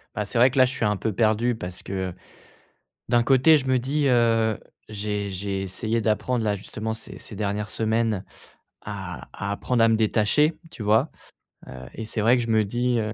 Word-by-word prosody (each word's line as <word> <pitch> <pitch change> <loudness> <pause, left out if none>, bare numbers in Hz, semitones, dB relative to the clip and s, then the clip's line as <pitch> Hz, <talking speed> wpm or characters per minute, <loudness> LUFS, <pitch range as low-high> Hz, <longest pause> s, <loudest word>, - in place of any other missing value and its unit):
Bah 105 - -1
c'est 110 +4 -4
vrai 125 +3 +6
que 135 - -7
là, 130 - +7
je 125 - -2
suis 115 - -2
un 105 - +2
peu 110 - -2
perdu 115 +4 +2
parce 90 -4 -7
que 95 -2 -3 1.0
d'un 120 -1 +4
côté 135 +5 +5
je 135 -3 -1
me 130 -1 +3
dis, 140 +4 0
heu, 115 -2 +3 0.3
j'ai 105 -1 -3
j'ai 95 +1 -3
essayé 110 +4 -2
d'apprendre 110 +2 0
là, 105 -1 +1
justement 110 +3 -5
ces 110 - -9
ces 105 - -10
dernières 105 0 -2
semaines 110 -3 0 0.6
à 95 -3 -7
à 100 -1 -4
apprendre 115 +3 +1
à - - +6
me 115 - +4
détacher, 110 +8 +2
tu 110 - -8
vois? 110 +2 +3 0.6
Heu, 65 0 -9
et 110 - -6
c'est 110 0 -3
vrai 120 +4 +5
que 120 - 0
je 115 - -5
me 110 -1 +3
dis, 120 +3 0
heu. 110 0 -2
110 Hz, 205 wpm, -24 LUFS, 105-120 Hz, 1.0 s, là